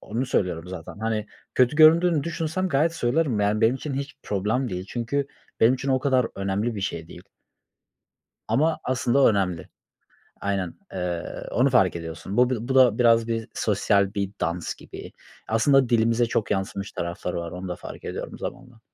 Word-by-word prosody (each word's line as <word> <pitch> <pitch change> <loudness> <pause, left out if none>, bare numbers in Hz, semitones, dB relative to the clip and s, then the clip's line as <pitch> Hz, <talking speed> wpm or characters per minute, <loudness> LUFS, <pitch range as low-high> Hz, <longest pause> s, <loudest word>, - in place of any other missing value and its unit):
onu 120 +5 -3
söylüyorum 90 -7 -1
zaten, 90 +2 -8
hani, 110 -1 -2 0.3
kötü 125 +3 +3
göründüğünü 160 0 +6
düşünsem 170 +3 -2
gayet 160 +2 +2
söylerim. 125 -4 +1
Yani, 105 +2 +1
benim 115 +3 +4
için 140 +1 -5
hiç 140 +1 -5
problem 105 +6 -1
değil. 90 0 -4
Çünkü 125 +4 -2 0.3
benim 120 +3 +6
için 135 +1 -5
o 130 -1 +3
kadar 130 -3 +2
önemli 100 +4 -1
bir 100 - -4
şey 85 -5 -4
değil. - - -11 1.3
Ama 155 +3 +2
aslında 130 +1 +2
önemli. 95 -6 0 0.7
Aynen, 95 -3 -2 0.2
eee, 90 -2 -4
onu 130 +3 +3
fark 95 -9 +3
ediyorsun. 85 +4 -6
Bu 125 0 +4
bir 120 -1 -3
bu 135 - 0
da 125 -4 +5
biraz 115 -1 +4
bir 115 -1 -2
sosyal 100 -1 +1
bir 100 -1 -1
dans 85 +1 -2
gibi. - - -11 0.4
Aslında 130 +3 +4
dilimize 115 0 +3
çok 115 -2 -1
yansımış 100 0 -2
tarafları 85 +1 -4
var. 85 -1 -4
Onu 90 +1 -6
da 90 - -4
fark - - -10
ediyorum - - -6
zamanla. 120 -3 -8
115 Hz, 170 wpm, -25 LUFS, 95-130 Hz, 1.3 s, göründüğünü